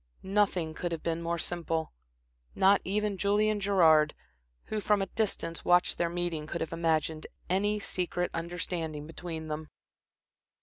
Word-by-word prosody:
Nothing 190 Hz, -5 st, +1 dB
could 175 Hz, +2 st, -3 dB
have 165 Hz, -2 st, -4 dB
been 165 Hz, 0 st, -1 dB
more 170 Hz, 0 st, -1 dB
simple. 165 Hz, -1 st, -2 dB, 0.6 s
Not 195 Hz, +1 st, +5 dB
even 205 Hz, 0 st, -1 dB
Julian 210 Hz, +2 st, +2 dB
Gerard, 165 Hz, -6 st, +4 dB, 0.5 s
who 215 Hz, -1 st, -3 dB
from 210 Hz, 0 st, +3 dB
a 195 Hz, -, 0 dB
distance 190 Hz, -5 st, -2 dB
watched 175 Hz, 0 st, +3 dB
their 170 Hz, -, +2 dB
meeting, 170 Hz, -3 st, -2 dB
could 170 Hz, -, -3 dB
have 160 Hz, 0 st, -3 dB
imagined 160 Hz, -1 st, 0 dB, 0.2 s
any 205 Hz, +3 st, +2 dB
secret 180 Hz, -2 st, -2 dB
understanding 165 Hz, -2 st, -3 dB
between 160 Hz, 0 st, -6 dB
them. 155 Hz, 0 st, -5 dB
175 Hz, 140 wpm, -30 LUFS, 160-195 Hz, 0.6 s, Not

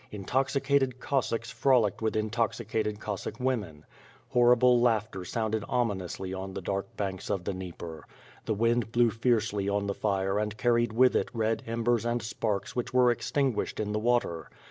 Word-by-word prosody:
Intoxicated 135 Hz, +4 st, 0 dB
Cossacks 115 Hz, -4 st, -1 dB
frolicked 120 Hz, -8 st, +2 dB
with 110 Hz, -1 st, 0 dB
intoxicated 110 Hz, -1 st, -1 dB
Cossaek 105 Hz, +2 st, -5 dB
women. 105 Hz, -, -2 dB, 0.4 s
Hor 120 Hz, 0 st, +5 dB
rible 125 Hz, 0 st, +5 dB
laughter 110 Hz, -5 st, +1 dB
sounded 110 Hz, +2 st, -2 dB
ominously 95 Hz, -6 st, -2 dB
on 95 Hz, 0 st, -6 dB
the 95 Hz, -, -4 dB
dark 100 Hz, +1 st, -3 dB
banks 95 Hz, -2 st, -3 dB
of 95 Hz, -, -1 dB
the 100 Hz, -, -2 dB
Dnieper. 85 Hz, -4 st, -8 dB, 0.4 s
The 110 Hz, -, 0 dB
wind 115 Hz, +1 st, +1 dB
blew 120 Hz, -1 st, +3 dB
fiercely 110 Hz, -3 st, 0 dB
on 100 Hz, 0 st, 0 dB
the 100 Hz, -, -1 dB
fire 100 Hz, -1 st, 0 dB
and 105 Hz, 0 st, -2 dB
carried 120 Hz, -1 st, +2 dB
with 125 Hz, +3 st, +4 dB
it -, -, +1 dB
red 110 Hz, 0 st, 0 dB
embers 115 Hz, 0 st, +1 dB
and 120 Hz, 0 st, 0 dB
sparks 105 Hz, -2 st, -2 dB
which 125 Hz, -, -2 dB
were 125 Hz, -1 st, +5 dB
extinguished 130 Hz, +1 st, -1 dB
in 105 Hz, -1 st, -1 dB
the 105 Hz, -, 0 dB
water. 110 Hz, -9 st, 0 dB
110 Hz, 165 wpm, -29 LUFS, 100-120 Hz, 0.4 s, Hor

